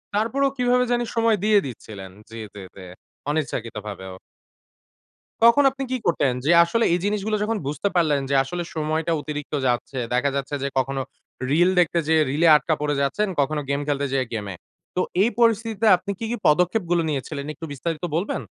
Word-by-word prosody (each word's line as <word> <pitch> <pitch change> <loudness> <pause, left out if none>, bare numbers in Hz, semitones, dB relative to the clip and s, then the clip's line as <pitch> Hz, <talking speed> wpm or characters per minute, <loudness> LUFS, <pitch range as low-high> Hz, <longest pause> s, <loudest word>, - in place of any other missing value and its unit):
তারপরেও 265 +6 +1
কিভাবে 250 0 +3
জানি 240 0 +1
সময় 230 -1 +3
দিয়ে 210 -1 +5
দিচ্ছিলেন। 105 -6 -9 0.2
জি, 115 - -11 0.2
জি, 105 - -10 0.2
জি 95 - -11 0.5
অনিচ্ছাকৃতভাবেও। 110 -9 -4 1.3
তখন 235 +5 +7
আপনি 270 0 -5
কি 260 - +1
করতেন? 145 -5 +2
যে 160 - +4
আসলে 230 +7 +1
এই 175 - +1
জিনিসগুলো 210 +1 -1
যখন 225 +1 -1
বুঝতে 150 +8 -1
পারলেন 155 -5 +3
যে 140 - +1
আসলে 175 +5 -4
সময়টা 155 +1 -1
অতিরিক্ত 150 0 -6
যাচ্ছে। 125 +2 -2 0.2
দেখা 125 +3 +2
যাচ্ছে 140 +1 -3
যে - - 0
কখনো 135 +1 0 0.5
reels 175 +6 +3
দেখতে 170 0 +2
যেয়ে 160 -1 +4
রিলে 160 +4 +3
এ - - +9
আটকা 155 +2 +1
পড়ে 150 -1 0
যাচ্ছেন, 140 +10 0
কখনো 150 +2 +1
গেম 140 0 0
খেলতে 145 -1 0
যেয়ে 130 -1 +1
গেমে। 105 -3 -4 0.4
তো 180 - +2 0.2
এই 215 - +4
পরিস্থিতিতে 225 -1 +2
আপনি 200 +3 -5
কি, 230 - -3
কি, 240 - -2
পদক্ষেপ 180 +7 +3
গুলো 175 -1 +3
নিয়েছিলেন 140 0 -4
একটু 165 - -8
বিস্তারিত 160 +3 -4
বলবেন? 170 -4 -1
160 Hz, 180 wpm, -23 LUFS, 140-210 Hz, 1.3 s, এ